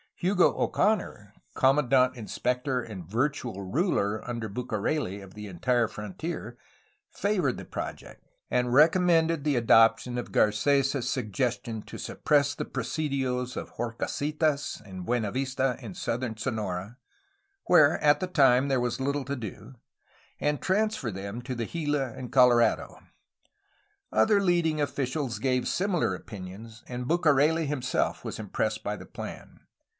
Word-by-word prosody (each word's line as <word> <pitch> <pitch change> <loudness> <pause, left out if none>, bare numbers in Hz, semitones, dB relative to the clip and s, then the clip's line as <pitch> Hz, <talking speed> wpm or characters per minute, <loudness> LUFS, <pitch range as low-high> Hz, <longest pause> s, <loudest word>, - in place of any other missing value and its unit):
Hugo 180 0 +3
Oconor, 180 - 0 0.2
commandant 130 -2 +3
inspector 125 +3 -1
and 100 -8 -8
virtual 120 -3 -1
ruler, 110 - 0
under 120 -2 -3
Bucareli, 110 0 -2
of 95 -1 -12
the 105 0 -8
entire 115 +6 +1
frontier, 115 - -6 0.5
favored 200 -1 0
the - - -8
project, - - -7 0.3
and 125 0 +1
recom 155 +8 +5
mended 165 -3 +3
the 145 -2 +1
adoption 115 +1 +4
of 120 - -7
Garces' 135 +4 +2
suggestion 120 -2 -2
to - - -9
suppress 145 -1 +1
the - - -4
presidios 130 -5 -2
of - - -5
Horcasitas 145 +5 -2
and 95 -2 -8
Buenavista 130 +3 0
in 110 -6 -7
southern 115 -2 -3
Sonora, 110 -2 -3 0.7
where 155 -4 +5
at 145 -1 +4
the 185 - -2
time 135 -6 +4
there 130 -2 +2
was 120 +1 -1
little 140 +1 -1
to 140 - -3
do, 115 +1 -8 0.7
and 150 0 0
transfer 205 - 0
them 100 +5 -6
to 130 +1 -4
the 115 -1 -2
Gila 145 -6 -2
and 125 +1 -8
Colorado. 125 -3 +4 1.1
Other 110 - +4
leading 170 -5 +2
officials 135 -4 -2
gave 125 +1 0
similar 185 -2 0
opinions, 110 +2 -10
and 125 0 -5
Bucareli 160 0 +3
himself 130 -3 -1
was - - -5
impressed - - -2
by - - -2
the - - -10
plan. - - -9
125 Hz, 130 wpm, -28 LUFS, 115-150 Hz, 1.1 s, recom